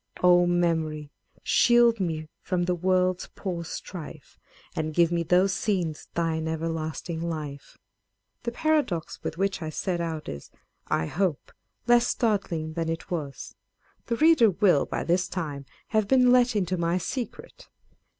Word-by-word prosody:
O 175 0 +6
Memory! 160 -4 0 0.3
shield 240 -2 +4
me 160 -4 -2
from 180 -1 -1
the 180 +1 +1
world's 185 +1 +1
poor 175 -4 -4
strife, 160 -3 -8 0.4
And 155 -1 -3
give 170 -1 +4 0.2
those 185 +2 +4
scenes 175 -5 -2
thine 160 -1 -1
everlasting 160 0 -3
life! 155 -4 -5 0.6
The 235 - -3
paradox 285 - 0
with 165 - -5
which 195 0 -1
I 160 - -3
set 175 +2 -2
out 160 -2 -4
is, 70 0 -7 0.4
I 80 - 0
hope, 175 - -2 0.3
less 240 0 +5
startling 190 -9 -1
than 165 0 -2
it 165 +3 -5
was; 150 -6 -5 0.5
the 235 - 0
reader 305 -5 +5
will, 185 -6 +3
by - - -3
this 180 +2 +1
time, 145 -6 -4 0.2
have 215 -3 +1
been 250 0 +5
let 245 -2 +4
into 185 -3 0
my 170 +1 +1
secret. 240 +7 -6
175 Hz, 140 wpm, -26 LUFS, 160-200 Hz, 0.6 s, O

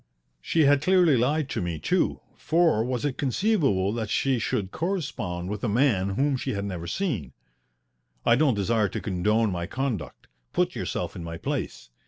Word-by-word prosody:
She 165 - +1
had 145 -1 +5
clearly 180 -2 +4
lied 140 +5 +1
to - - -2
me, 85 -2 -2
too, - - 0
for 160 -9 +2
was 125 +1 -2
it 140 -3 -2
conceivable 135 - +1
that 110 -3 -3
she 135 -3 +1
should 100 -2 -2
correspond 130 - -3
with 105 +1 -5
a 120 - +1
man 100 -5 +2
whom 140 +2 +1
she 130 +1 -3
had 100 0 -3
never 90 -4 -5
seen? 120 - -2 0.9
I 115 - +6
don't 135 -2 +3
desire 105 +1 +1
to - - -4
condone 105 +3 +1
my 85 -1 -3
conduct. 110 - -4 0.3
Put - - +1
yourself - - -3
in 85 - -6
my 85 0 -6
place. - - -4
115 Hz, 175 wpm, -26 LUFS, 95-145 Hz, 0.9 s, I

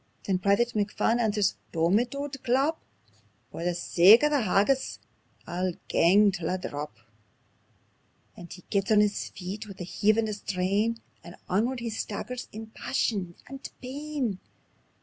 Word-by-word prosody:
Then 190 -2 0
Private 200 +5 +3
McPhun 215 +3 +1
answers: 210 -4 +1
"Dommit, 200 +10 +1
auld 280 0 -4
chap! 270 +6 +2 0.7
For 165 - -6
the 175 0 0
sake 185 +7 +6
o' 300 - +5
that 285 -6 +1
haggis 210 +8 +2 0.5
I'll 180 +1 -2 0.2
gang 200 +4 +5
till 175 -4 -3
I 185 - 0
drap." 145 -8 -6 1.4
And 175 -1 -11
he 180 +1 -10
gets 200 +2 +1
on 215 - +6
his 210 -1 +1
feet 200 +4 -7
wi' 200 - -9
a - - -5
heave 210 +4 +2
and 225 -1 +1
a 215 - -2
strain, 200 +3 0 0.3
And 170 - -11
onward 235 +7 0
he 235 -1 -3
staggers 225 +3 -5
in 220 +1 -9
passion 195 -9 -2
and 270 +1 -8
pain. 265 -5 -3
210 Hz, 150 wpm, -27 LUFS, 185-240 Hz, 1.4 s, sake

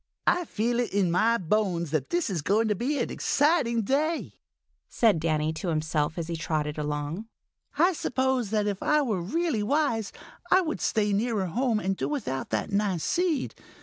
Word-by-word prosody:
"I 355 - +2
feel 235 0 -1
it 245 - -1
in 195 -4 +2
my 225 +7 +3
bones 180 -4 0
that 155 -3 -1
this 345 -10 0
is 170 -5 -1
going 210 +8 +2
to - - +3
be 260 +9 -1
an 240 - -1
exciting 275 -7 +2
day," 280 - 0 0.6
said 215 -8 +3
Danny 155 -1 0
to 170 +4 -5
himself 155 -1 -1
as 170 - -2
he 170 - -3
trotted 155 -2 -2
along. 150 +7 -3 0.5
"I 350 +5 +4
suppose 260 - 0
that 210 -1 +1
if 200 -2 -2
I 300 -1 +3
were 215 -9 -1
really 305 - -1
wise, 230 -3 0 0.4
I 375 - +6
would 320 -3 -3
stay 210 -2 +1
nearer 215 -1 0
home 230 +5 0
and 195 -1 -1
do - - -3
without 205 - -3
that - - -2
nice 200 -5 0
seed. 345 - 0
210 Hz, 180 wpm, -27 LUFS, 170-265 Hz, 0.6 s, I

